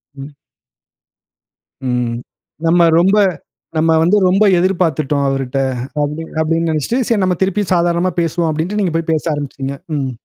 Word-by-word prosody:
ம். 135 +1 -8 1.6
ம். 125 -1 -1 0.5
நம்ம 170 0 +4
ரொம்ப 195 +4 +3 0.6
நம்ம 160 +1 +2
வந்து, 180 +6 +3
"ரொம்ப 195 +3 +3
எதிர்பாத்துட்டோம் 160 -6 0
அவர்ட்ட" 135 0 -2 0.4
அப்டி 150 +3 -3 0.2
அப்டீன்னு 165 +1 0
நெனைச்சுட்டு, 155 - -1
"சரி 225 -4 +1
நம்ம 180 -1 +1
திருப்பியும் 195 0 0
சாதாரணமா 175 +1 +1
பேசுவோம்" 165 0 0
அப்டீன்ட்டு 165 +7 -2
நீங்க 175 -4 -1
போயி 165 0 0
பேச 155 - 0
ஆரம்பிச்சுட்டீங்க. 140 -1 -5 0.2
ம். 135 -2 -2
165 Hz, 135 wpm, -16 LUFS, 145-180 Hz, 1.6 s, நம்ம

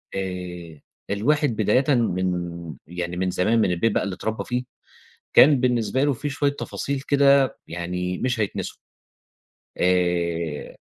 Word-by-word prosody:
آآ، 90 -4 -5 0.3
الواحد 140 +4 +1
بدايةً 125 +7 +3
من 90 -6 -1
يعني 90 +1 -4
من 95 0 0
زمان، 110 +6 +2
من 95 - +2
البيت 110 +6 +1
بقى - - 0
اللي 100 -2 -3
اتربّي 110 +3 -3
فيه، 125 0 -2 0.7
كان 140 -2 +7
بالنسبة 125 +1 +1
له 145 - +2
في 145 +4 -4
شوية 140 0 0
تفاصيل 140 -1 -3
كده 140 -1 +3
يعني 90 +2 -3
مش 120 -3 -1
هيتنسوا. 105 - -3 1.0
آآ، 85 -3 0
100 Hz, 130 wpm, -23 LUFS, 90-130 Hz, 1.0 s, كان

